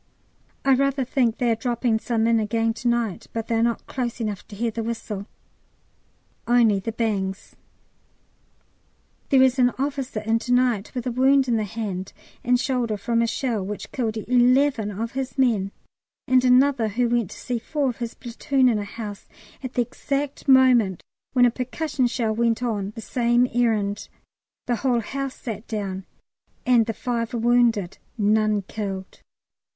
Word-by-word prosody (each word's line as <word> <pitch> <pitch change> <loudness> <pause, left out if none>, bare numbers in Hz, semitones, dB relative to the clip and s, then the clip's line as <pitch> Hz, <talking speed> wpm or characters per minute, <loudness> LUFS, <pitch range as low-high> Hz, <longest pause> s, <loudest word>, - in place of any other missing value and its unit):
I 270 - +5
rather 275 0 +1
think 240 -3 +1
they 240 -2 +1
are - - +2
dropping 235 -1 0
some 225 -1 0
in 230 0 +3
again 225 +1 0
to 240 - -4
night, 235 -5 -1
but 225 -1 -3
they 230 - -3
are 225 - +2
not 235 0 0
close 245 -2 -4
enough 210 -4 -4
to 205 - -10
hear 230 +2 -1
the 230 - -4
whistle, 220 -3 -5 1.2
only 230 -4 +4
the 210 +4 -4
bangs. 200 -4 -2 1.7
There 265 -2 +6
is 260 0 +3
an 245 -1 +5
officer 270 -4 -2
in 225 +1 +1
to 245 +1 -1
night 245 -5 +1
with 245 - -3
a 250 - -1
wound 265 +2 +3
in 240 - +2
the 215 -1 0
hand 200 -3 -5 0.3
and 250 +1 +3
shoulder 245 -5 -1
from 230 +3 0
a 230 - +2
shell 230 -3 -1
which 205 +2 -6
killed 225 -4 -2
eleven 250 0 +3
of 220 +3 -4
his 260 -2 -4
men, 220 -7 +2 0.6
and 255 0 +4
another 255 -1 +4
who 240 +4 0
went 235 -5 0
to - - -10
see 245 -2 -3
four 290 +4 -1
of 245 - -2
his 235 -1 -5
platoon 260 +2 +1
in 220 -3 +1
a - - -3
house 205 -1 -8 0.3
at 255 -1 -7
the 245 - +3
exact 275 +4 -4
moment 250 -8 +5 0.3
when 250 -2 +5
a 240 - +4
percussion 255 +2 -1
shell 235 -3 -1
went 230 +1 +1
on 205 -5 -1
the 225 - -7
same 240 +1 +2
errand; 215 -4 0 0.6
the 240 -1 0
whole 245 -2 +1
house 275 +3 -4
sat 220 -2 -7
down, 195 -3 -4 0.6
and 240 -3 +4
the 225 - -1
five 235 -1 -2
were - - -1
wounded 235 -5 +2 0.2
none 215 -1 +2
killed. 195 -2 -6
235 Hz, 175 wpm, -24 LUFS, 220-250 Hz, 1.7 s, There